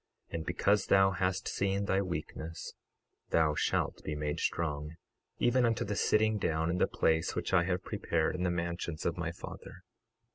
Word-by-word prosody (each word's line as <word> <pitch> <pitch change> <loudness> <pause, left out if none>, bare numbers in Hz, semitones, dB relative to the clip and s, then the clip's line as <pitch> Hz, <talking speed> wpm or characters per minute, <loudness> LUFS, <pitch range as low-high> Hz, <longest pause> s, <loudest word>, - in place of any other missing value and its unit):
And 80 - -3
because 100 0 +2
thou 95 0 +5
hast 90 +1 -1
seen 100 0 0
thy 95 0 +2
weakness 80 -2 -5 0.6
thou 80 -2 +3
shalt - - 0
be 75 - -3
made 75 0 -2
strong, 75 -1 -2 0.4
even 125 +1 +3
unto 115 0 +1
the 105 -1 -2
sitting 110 +1 +3
down 80 -1 0
in 90 - -1
the - - +4
place 80 0 +1
which - - -2
I 85 -2 +5
have 90 0 -1
prepared 80 -2 0
in 90 - -4
the 90 - +2
mansions 85 -2 -3
of - - +1
my - - -2
Father. - - -10
90 Hz, 175 wpm, -32 LUFS, 80-95 Hz, 0.6 s, thou